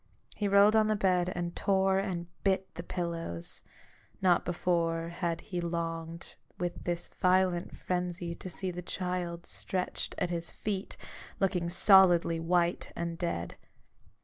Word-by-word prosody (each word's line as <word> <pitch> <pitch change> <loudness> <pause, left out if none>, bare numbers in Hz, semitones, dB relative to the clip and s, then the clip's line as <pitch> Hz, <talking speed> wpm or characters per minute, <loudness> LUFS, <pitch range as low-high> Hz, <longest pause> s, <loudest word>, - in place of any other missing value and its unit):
He 205 - -1
rolled 200 +2 +6
on 215 -1 +5
the 215 - +2
bed, 185 -3 +2
and 175 -1 -3
tore 190 -1 +2
and 185 -3 -2 0.2
bit 190 -1 +1
the - - -5
pillows: 170 - -4 0.6
not 180 -2 +4
before 170 -1 0
had 170 -1 -2
he 180 -4 -4
longed 165 -1 -4 0.2
with 175 0 -4
this 175 -1 -1
violent 185 -1 +1
frenzy 180 -1 -2
to 185 - -8
see 185 +2 -3
the 180 0 -6
child 180 -1 -3
stretched 185 -1 -3
at 175 - -1
his 170 -1 -2
feet, 200 -2 -4 0.4
looking 180 -3 +1
solidly 175 -3 +6
white 170 +1 +1
and 170 0 -3
dead. 130 - -3
175 Hz, 140 wpm, -31 LUFS, 170-190 Hz, 0.6 s, rolled